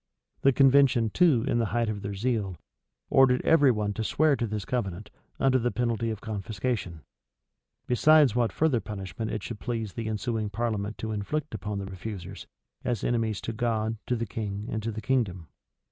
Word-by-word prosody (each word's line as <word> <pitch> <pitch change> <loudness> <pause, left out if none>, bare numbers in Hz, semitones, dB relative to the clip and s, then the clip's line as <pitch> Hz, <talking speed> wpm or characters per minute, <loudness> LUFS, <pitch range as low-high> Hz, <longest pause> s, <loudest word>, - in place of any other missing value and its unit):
[*] - - -45
The 135 - +5
convention, 135 -4 +4
too, 150 -10 +4
in 120 - +1
the 115 - +1
height 115 -1 +1
of 105 -2 -3
their 100 0 -4
zeal, 100 -4 -1 0.5
ordered 130 -2 +5
every 145 -4 +5
one 105 -3 0
to 110 - -3
swear 155 +5 +3
to 120 -3 -2
this 105 -2 -4
covenant, 105 -5 -3 0.3
under 130 -1 +3
the 120 +1 +1
penalty 115 0 -1
of 110 -2 -4
confiscation; 105 -4 -3 0.8
besides 145 0 +5
what 120 -2 +2
further 150 -6 +2
punishment 105 0 -5
it 110 -3 -4
should 115 -3 -6
please 115 -5 -3
the 115 -1 -4
ensuing 110 0 -2
parliament 105 -1 -2
to 110 - -4
inflict 110 +7 -3
on 105 -1 -2
the 100 - -4
refusers, 95 0 -7 0.4
as 120 -5 -1
enemies 115 -3 0
to 115 - -4
God, 110 -1 -1
to 125 - +1
the 115 0 -2
king, 105 -2 -4
and 110 - -2
to 115 +2 -3
the 110 0 -6
kingdom. 100 -9 -1
110 Hz, 185 wpm, -27 LUFS, 105-125 Hz, 0.8 s, The